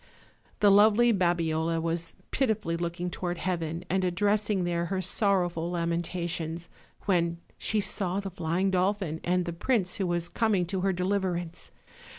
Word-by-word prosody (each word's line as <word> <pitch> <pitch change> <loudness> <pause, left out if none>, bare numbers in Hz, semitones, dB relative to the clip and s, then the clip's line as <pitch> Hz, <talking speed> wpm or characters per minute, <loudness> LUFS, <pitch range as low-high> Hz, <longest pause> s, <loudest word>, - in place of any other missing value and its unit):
The 205 -1 +7
lovely 220 +4 +6
Babiola 165 -3 +1
was 165 0 -2 0.2
pitifully 220 -10 0
looking 175 +1 -3
toward 175 0 -3
heaven, 170 -2 -2
and 190 +1 0
addressing 205 +2 +1
there 170 -1 0
her 190 +2 -2
sorrowful 180 -3 +1
lamentations, 170 -1 -2 0.4
when 170 -3 +1 0.2
she 215 - 0
saw 195 -1 -1
the 195 -1 -5
flying 175 +2 0
dolphin 185 -3 0
and 180 0 +1
the 170 - -3
prince 185 0 0
who 190 - 0
was 175 -1 0
com 220 +1 +1
ing 180 -2 +1
to 185 +1 -2
her 195 +1 +2
deliverance. 180 -2 -2
180 Hz, 150 wpm, -28 LUFS, 170-195 Hz, 0.4 s, The